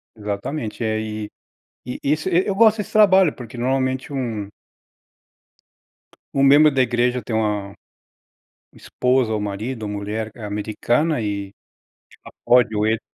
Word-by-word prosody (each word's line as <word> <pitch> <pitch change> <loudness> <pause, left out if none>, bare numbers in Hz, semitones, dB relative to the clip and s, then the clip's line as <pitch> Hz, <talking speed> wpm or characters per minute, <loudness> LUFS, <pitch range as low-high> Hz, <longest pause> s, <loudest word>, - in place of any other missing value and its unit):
Exatamente, 110 +3 -4
é 110 -1 0
e 110 -1 -5 0.6
e 125 - -6
isso 155 +5 0
eu 185 +2 +1
gosto 220 +1 +5
desse 210 - -5
trabalho, 190 -6 +5
porque 120 -1 -10
normalmente 130 +2 -1
um 115 -7 -3 1.9
um 135 - +2
membro 145 +3 +7
da 135 -2 +2
igreja 125 +1 +1
tem 110 - -3
uma 105 -2 -1 1.0
uma - - -20
esposa, 125 -3 0
ou 110 - -1
marido, 110 +4 -4
ou 105 - -4
mulher, 105 +2 -4
eh, 115 - -10
americana, 115 +9 -1
ela 100 -2 -6 0.7
pode 120 -3 +4
ou 105 +1 +1
ele 110 0 +1
120 Hz, 135 wpm, -21 LUFS, 105-135 Hz, 1.9 s, membro